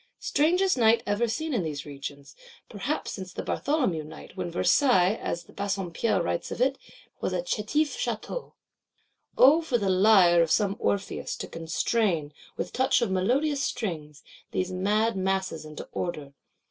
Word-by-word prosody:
Strangest 355 Hz, +2 st, +2 dB
Night 230 Hz, 0 st, +4 dB
ever 205 Hz, +4 st, +1 dB
seen 305 Hz, +8 st, -2 dB
in 230 Hz, -, +1 dB
these 150 Hz, -4 st, -4 dB
regions,—perhaps 200 Hz, -, -6 dB
since 190 Hz, -2 st, -7 dB
the -, -, -5 dB
Bartholomew 255 Hz, -, 0 dB
Night, 155 Hz, +3 st, -12 dB
when 185 Hz, -2 st, -3 dB
Versailles, 185 Hz, -, +3 dB
as 170 Hz, -5 st, -4 dB
Bassompierre 200 Hz, +1 st, -1 dB
writes 85 Hz, 0 st, -2 dB
of -, -, -6 dB
it, 265 Hz, +2 st, +1 dB, 0.4 s
was -, -, -2 dB
a -, -, -1 dB
chétif 315 Hz, -11 st, 0 dB
château. 240 Hz, -, -4 dB, 0.8 s
O 295 Hz, +6 st, +7 dB
for 290 Hz, -7 st, 0 dB
the 200 Hz, -4 st, -1 dB
Lyre 185 Hz, -3 st, +6 dB
of 165 Hz, -, +2 dB
some 200 Hz, +2 st, +2 dB
Orpheus, 200 Hz, -1 st, -2 dB
to -, -, -6 dB
constrain, 165 Hz, -1 st, -1 dB, 0.2 s
with -, -, -4 dB
touch 255 Hz, -1 st, +2 dB
of 200 Hz, -, -1 dB
melodious 270 Hz, +10 st, +1 dB
strings, 155 Hz, -, -4 dB, 0.3 s
these 185 Hz, 0 st, -2 dB
mad 210 Hz, +4 st, +1 dB
masses 190 Hz, -4 st, -1 dB
into 155 Hz, 0 st, -8 dB
Order! 150 Hz, -5 st, -4 dB
200 Hz, 145 wpm, -27 LUFS, 170-255 Hz, 0.8 s, O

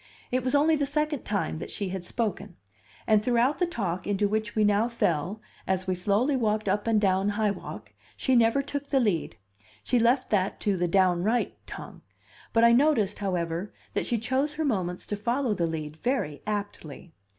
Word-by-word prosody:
It 255 Hz, 0 st, 0 dB
was 255 Hz, +3 st, +1 dB
only 310 Hz, +3 st, +4 dB
the 285 Hz, -2 st, 0 dB
second 300 Hz, -1 st, -1 dB
time 200 Hz, -6 st, -2 dB
that -, -, -6 dB
she 200 Hz, -2 st, -3 dB
had 185 Hz, -1 st, -4 dB
spoken; 205 Hz, -2 st, -3 dB, 0.5 s
and 215 Hz, -2 st, +4 dB
throughout 245 Hz, +4 st, +2 dB
the 355 Hz, -, +2 dB
talk 185 Hz, -, -3 dB
into 205 Hz, 0 st, +1 dB
which 215 Hz, 0 st, -2 dB
we 215 Hz, -, +3 dB
now 205 Hz, +2 st, +3 dB
fell 195 Hz, -3 st, -1 dB, 0.3 s
as 190 Hz, 0 st, 0 dB
we 185 Hz, -, 0 dB
slowly 205 Hz, +10 st, +1 dB
walked 215 Hz, -4 st, 0 dB
up 205 Hz, +3 st, 0 dB
and 225 Hz, -2 st, +3 dB
down 195 Hz, 0 st, +2 dB
High 210 Hz, 0 st, +1 dB
Walk, -, -, -8 dB, 0.2 s
she 260 Hz, -, +2 dB
never 235 Hz, +4 st, +4 dB
took 285 Hz, 0 st, -4 dB
the 275 Hz, -, +2 dB
lead; 200 Hz, -, 0 dB, 0.5 s
she 245 Hz, -, +2 dB
left 245 Hz, +3 st, +2 dB
that 195 Hz, -2 st, +1 dB
to 205 Hz, -2 st, +1 dB
the 175 Hz, -1 st, 0 dB
"downright" 185 Hz, +5 st, +2 dB
tongue -, -, -9 dB, 0.5 s
but 230 Hz, -, +3 dB
I 235 Hz, -, +7 dB
noticed, 235 Hz, -6 st, +3 dB
however, 180 Hz, -1 st, -2 dB, 0.2 s
that -, -, -1 dB
she 235 Hz, -, +1 dB
chose 260 Hz, +6 st, 0 dB
her 315 Hz, +1 st, -2 dB
moments 185 Hz, -9 st, -1 dB
to 205 Hz, -, -3 dB
follow 235 Hz, +3 st, 0 dB
the 170 Hz, -4 st, 0 dB
lead 155 Hz, -1 st, -5 dB
very 200 Hz, -, -2 dB
aptly. 200 Hz, -6 st, -5 dB
210 Hz, 190 wpm, -27 LUFS, 190-245 Hz, 0.5 s, I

